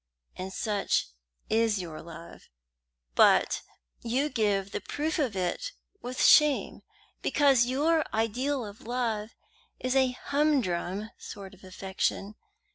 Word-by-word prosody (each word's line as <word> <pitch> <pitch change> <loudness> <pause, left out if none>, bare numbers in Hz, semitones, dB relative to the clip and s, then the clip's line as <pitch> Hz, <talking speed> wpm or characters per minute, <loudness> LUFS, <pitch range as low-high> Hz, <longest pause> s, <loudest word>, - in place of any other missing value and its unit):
And 185 +1 -6
such 205 - 0 0.4
is 225 -1 +2
your 165 -4 -6
love; 170 0 -12 0.6
but - - +4 0.4
you 260 +6 0
give 200 -5 0
the - - -3
proof 310 +2 -2
of 255 -9 0
it 190 - -2 0.3
with 250 +1 -2
shame, 300 -2 +5 0.4
because 270 -5 +4
your 305 +5 +2
ideal 245 +4 0
of 205 +1 -10
love 230 -3 -2 0.4
is 255 +1 -1
a 265 -1 +4
humdrum 225 - 0
sort 195 -2 -9
of 190 - -18
affection. 190 +2 -2
225 Hz, 120 wpm, -28 LUFS, 195-270 Hz, 0.6 s, shame